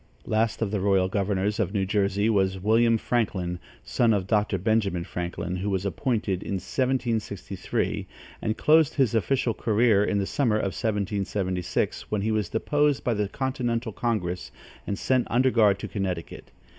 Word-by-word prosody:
Last 110 0 0
of 100 - -2
the 105 - 0
royal 95 -1 +2
governors 100 +1 -1
of 105 -1 -1
New 95 -1 +1
Jersey 100 +1 +1
was 95 -3 +1
William 115 +3 +3
Franklin, 95 -7 -1 0.2
son 115 -3 +2
of 95 -2 -1
Dr. 105 -1 +1
Benjamin 100 -3 0
Franklin, 90 0 -4
who 100 +3 -2
was 95 -1 -1
appointed 100 -2 -1
in - - -4
1763, 110 -2 -2 0.3
and 110 0 -1
closed 155 0 +4
his 130 -6 +2
official 115 +1 +1
career 110 -1 +3
in 100 - 0
the 100 - 0
summer 115 0 +1
of 100 -3 -1
1776, 100 -3 -2
when 105 -2 -1
he 110 - 0
was 105 -5 0
deposed 145 +6 +1
by 120 - +1
the 105 -2 -1
continental 125 -3 -2
congress 100 -6 -2 0.4
and 100 - -2
sent 130 +1 +1
under 130 +2 +3
guard 105 -5 +4
to - - -6
Connecticut. 95 -5 -4
105 Hz, 160 wpm, -26 LUFS, 95-115 Hz, 0.4 s, closed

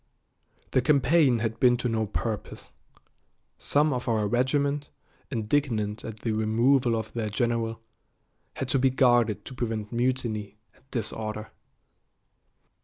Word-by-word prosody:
The 130 - +3
campaign 140 -1 +4
had 115 0 -3
been 125 -1 +5
to 125 - -1
no 110 -2 0
purpose. 110 0 -4 0.9
Some 150 +1 +2
of 125 -1 -4
our 110 -3 +1
regiment, 140 +5 0 0.4
indignant 110 -3 -1
at 110 -1 -8
the 115 - -1
removal 115 +3 +2
of 110 -1 -4
their 110 -3 -2
general, 115 +1 -1 0.8
had 135 - -3
to 135 - +2
be 135 +1 +4
guarded 120 -4 +3
to - - -8
prevent 110 -4 -3
mutiny 115 -4 -1 0.2
and - - -27
disorder. 110 -2 -4
120 Hz, 125 wpm, -27 LUFS, 110-130 Hz, 0.9 s, been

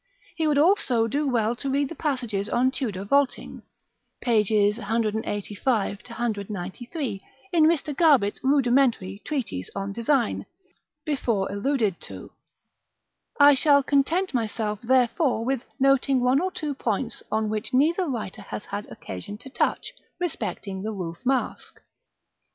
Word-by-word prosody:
He 320 -2 0
would 295 -2 +2
also 290 - +3
do 285 +6 -1
well 235 -3 +1
to 275 - -3
read 280 0 +1
the - - -6
passages 240 -10 -2
on 255 +2 +2
Tudor 215 -9 -3
vaulting, 280 +6 0 0.6
pp. 210 -3 +3
185 215 -1 -1
193, 220 - -4 0.3
in 325 -3 +5
Mr. 310 -2 +1
Garbett's 275 -11 +4
rudimentary 245 -7 +2
Treatise 240 - -3
on 200 0 -3
Design, 235 +2 0 0.6
before 235 -10 0
alluded 210 -2 0
to. - - -8 1.1
I 285 0 +9
shall 280 +1 +4
content 300 +7 +1
myself 215 -3 -1
therefore 245 0 +2
with 260 -1 -1 0.2
noting 275 -1 +3
one 255 +3 +3
or 375 +1 -1
two 300 -5 -3
points 230 -2 -2
on 220 0 +1
which 215 +2 -3
neither 325 +8 +2
writer 220 -5 -4
has 200 - -7
had 205 +1 -5
occasion 95 - -7
to 260 +4 -12
touch, - - -1 0.3
respecting 210 - -3
the 215 +2 -3
Roof 170 -5 -5
Mask. 260 0 -2
240 Hz, 130 wpm, -25 LUFS, 210-280 Hz, 1.1 s, I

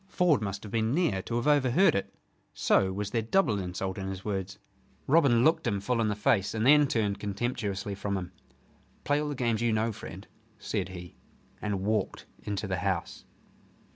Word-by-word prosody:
Ford 175 -10 +2
must 100 -1 -4
have 105 - -8
been 115 +2 +1
near 155 - +1
to 115 - -5
have 120 - -1
overheard 145 +5 +4
it. 100 - -2 0.4
So 95 -1 +3
was 100 +1 -4
there 115 - +1
double 115 - +2
insult 95 +1 -4
in 95 - -4
his 95 0 -6
words. 100 -2 -3 0.5
Robin 135 -6 +4
looked 160 +3 +3
him 100 - 0
full 115 +4 0
in 110 - +1
the 105 - 0
face, 105 0 +1
and 110 +1 0
then 145 +1 +6
turned 105 -5 0
contemptuously 100 -1 -3
from 100 0 -2
him. 90 -1 -6 0.7
"Play 145 +1 +1
all 150 - -2
the 145 - -3
games 115 -3 0
you 120 -1 +2
know, 110 +1 +1
friend," 100 -1 -9 0.3
said 100 -2 -3
he: 90 -1 -10 0.4
and 100 -3 -2
walked 105 0 -1 0.2
into 105 0 -3
the 95 -2 -2
house. 90 -2 -3
105 Hz, 190 wpm, -29 LUFS, 95-120 Hz, 0.7 s, then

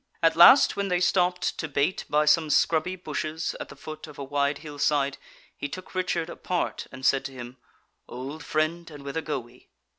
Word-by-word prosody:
At 165 0 +4
last 175 - +8
when 200 0 -1
they 180 -2 +1
stopped 180 0 +1
to 160 - -2
bait 145 +5 0
by 150 +1 +3
some 155 +1 +4
scrubby 165 +4 +2
bushes 155 -2 -4
at - - -7
the - - -11
foot 155 +1 -9
of 150 - -13
a 140 - -5
wide 140 +1 0
hill 145 -1 -8
side, 140 -1 +1 0.4
he 145 - -5
took 185 +5 -9
Richard 180 -3 -1
apart, 175 0 -3
and 130 0 -8
said 135 - +3
to - - -5
him: 125 0 -9 0.5
"Old 135 +5 -7
friend, 155 +4 -1
and 145 -3 -11
whither 140 +3 -3
go 155 -2 -2
we?" 120 0 -13
155 Hz, 200 wpm, -26 LUFS, 140-170 Hz, 0.5 s, last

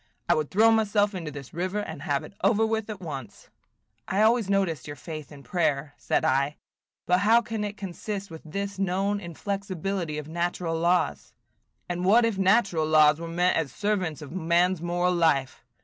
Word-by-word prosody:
I - - +5
would 155 -2 -1
throw 220 +4 +5
myself 210 -2 +2
into 170 -5 -5
this 140 -3 -9
river, 185 +4 -2
and 160 -8 -4
have 145 -1 -1
it - - -11
over 215 +2 +4
with 220 -1 -2
at 210 -3 -5
once." 135 - -8 0.6
"I 200 +3 +2
always 225 -2 +3
noticed 185 -9 0
your 145 - -6
faith 155 -2 -8
in 140 -2 -12
prayer," 145 -4 -1
said - - 0
I. 140 +3 +1 0.5
"But 180 0 +3
how 225 +4 +5
can 220 -1 -3
it 205 0 -4
consist 195 +1 -5
with 160 - -9
this 200 +4 -5
known 195 +2 0
inflexibility 190 -2 -4
of 150 -1 -6
natural 170 0 -2
laws?" 170 -7 0 0.5
"And 175 0 -3
what 225 +6 +5
if 220 -4 -1
natural 190 -5 +3
laws 155 -1 +5
were 170 - -5
meant 175 +2 +1
as 155 -5 -1
servants 185 -6 -2
of 145 - -10
man's 175 0 +1
moral 175 +1 +1
life? 160 -6 +1
180 Hz, 180 wpm, -26 LUFS, 155-200 Hz, 0.6 s, I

